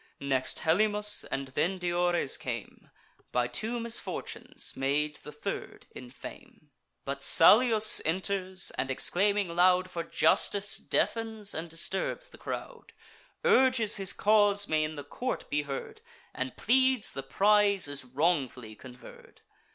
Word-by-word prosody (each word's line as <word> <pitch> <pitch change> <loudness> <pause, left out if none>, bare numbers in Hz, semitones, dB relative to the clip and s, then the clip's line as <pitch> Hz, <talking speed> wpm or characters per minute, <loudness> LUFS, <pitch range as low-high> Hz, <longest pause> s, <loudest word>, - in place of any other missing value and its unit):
Next 135 -2 -1
Helymus; 210 +5 +1
and 135 0 -4
then 180 +8 -1
Diores 175 -4 +1
came, - - -6 0.4
By 125 -1 +1
two 220 - -4
misfortunes 235 0 -4
made 150 +3 -1
the 150 - -11
third 150 - -6
in 125 - -11
fame. 145 +3 -13 0.3
But 140 0 -4
Salius 220 - +6
enters, 185 +2 -1
and, 130 - -1
exclaiming 195 +6 +1
loud 185 +1 +3
For 170 - -3
justice, 200 +4 +1
deafens 220 -3 -1
and 165 +1 -5
disturbs 190 - -4
the - - -16
crowd; 470 -2 -7 0.5
Urges 260 - +3
his 195 -1 -1
cause 205 -1 +3
may 155 -1 +1
in 155 0 -4
the 145 - -7
court 255 - -5
be 145 0 +1
heard; 140 -2 -7 0.3
And 130 -1 -5
pleads 260 0 +2
the 135 - -4
prize 200 +6 +2
is 145 -1 -5
wrongfully 130 -5 -1
conferr'd. 125 +2 -15
180 Hz, 130 wpm, -29 LUFS, 145-210 Hz, 0.5 s, Salius